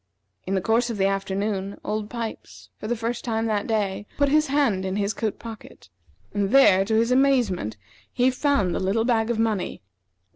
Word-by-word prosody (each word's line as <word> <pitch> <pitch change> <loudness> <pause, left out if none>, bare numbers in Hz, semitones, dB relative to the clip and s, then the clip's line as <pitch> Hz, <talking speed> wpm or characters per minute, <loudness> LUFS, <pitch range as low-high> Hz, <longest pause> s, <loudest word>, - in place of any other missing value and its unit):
In 195 - 0
the 190 - +1
course 230 +5 +1
of 230 - -3
the 195 - +2
afternoon, 195 0 -2
Old 210 0 -3
Pipes, 230 -2 -7
for - - -6
the 240 - 0
first 235 +1 -3
time 225 -1 -1
that 210 -2 -1
day, 205 -2 -1
put 285 -1 +3
his 305 +2 +3
hand 270 -9 +1
in 190 0 -2
his 205 +1 0
coat 215 +1 -3
pocket, 225 - -11 0.4
and 200 -1 0
there, 200 -7 +6
to 220 +3 -1
his 230 +2 +2
amazement, 245 - +2 0.3
he 255 +1 +2
found 255 - +1
the - - -1
little 200 +4 0
bag 230 -2 +1
of 235 - 0
money. 220 - -1
220 Hz, 190 wpm, -24 LUFS, 195-240 Hz, 0.4 s, there